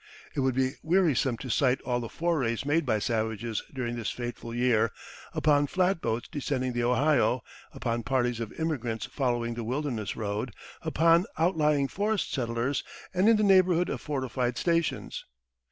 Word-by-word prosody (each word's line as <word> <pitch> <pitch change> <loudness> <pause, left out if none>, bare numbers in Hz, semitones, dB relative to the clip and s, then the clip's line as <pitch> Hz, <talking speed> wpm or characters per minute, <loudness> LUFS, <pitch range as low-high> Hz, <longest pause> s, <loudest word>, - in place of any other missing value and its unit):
It - - -3
would 130 -2 +1
be 130 0 +2
wearisome 160 -8 +2
to 130 - -7
cite 130 +1 +3
all 125 -1 -1
the 115 -2 -5
forays 140 -9 0
made 150 +1 +1
by 110 -3 +3
savages 110 0 -1
during 120 -3 -3
this 115 -3 -2
fateful 120 -1 -5
year, 115 -2 +2 0.4
upon 145 -1 +3
flatboats 165 - 0
descending 130 -3 -2
the 120 0 0
Ohio, 125 -1 +3 0.3
upon 115 0 -2
parties 120 -1 0
of 115 -2 -4
immigrants 125 -9 -2
following 120 -3 -1
the 115 0 -4
Wilderness 120 -3 -2
Road, 105 +2 -3 0.3
upon 165 +4 +3
outlying 150 -4 +2
forest 205 +5 -1
settlers, 120 +1 -1 0.3
and 190 +4 +4
in 225 - +6
the 215 - +2
neighborhood 185 -3 +4
of - - -3
fortified 130 -4 -2
stations. 170 -2 0
130 Hz, 155 wpm, -28 LUFS, 120-155 Hz, 0.4 s, in